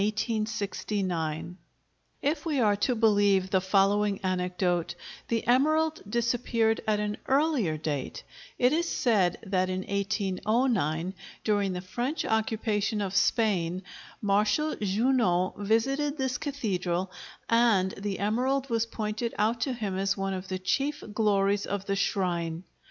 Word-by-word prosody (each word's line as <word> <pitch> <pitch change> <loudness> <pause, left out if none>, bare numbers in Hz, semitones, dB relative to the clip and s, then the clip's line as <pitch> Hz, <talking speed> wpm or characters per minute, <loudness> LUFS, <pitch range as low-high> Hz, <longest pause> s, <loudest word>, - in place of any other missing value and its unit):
If 290 +2 0
we 305 -5 0
are 210 -4 +4
to 245 +5 +1
believe 205 -4 +3
the 190 - +3
following 200 +1 +2
anecdote, 180 -1 0 0.3
the 230 -1 -1
emerald 310 +6 +2
disappeared 235 -1 +1
at 210 -1 +2
an 210 0 -2
earlier 265 - +2
date: 150 -3 -4 0.3
It 250 +2 +3
is 335 +1 +1
said 200 -8 +2
that 185 -2 0
in 185 0 -2
1809, 200 - 0 0.3
during 205 -3 +1
the 180 - -4
French 245 - -3
occupation 220 -1 0
of 195 -2 -2
Spain, 195 -5 +1 0.4
Marshal 210 +9 +2
Junot 205 -3 +1
visited 270 +8 +1
this 265 -2 -1
cathedral, 190 - -2 0.4
and 230 -5 +3
the 195 0 -4
emerald 255 +6 0
was 230 0 +1
pointed 220 +1 -3
out 225 +3 +1
to 265 - 0
him 205 -5 -3
as 195 +1 0
one 195 0 -1
of 185 0 -5
the 185 - -2
chief 275 +10 -1
glories 205 -2 +2
of 200 -1 -3
the 195 - 0
shrine. 175 -4 -1
210 Hz, 130 wpm, -28 LUFS, 190-240 Hz, 0.4 s, are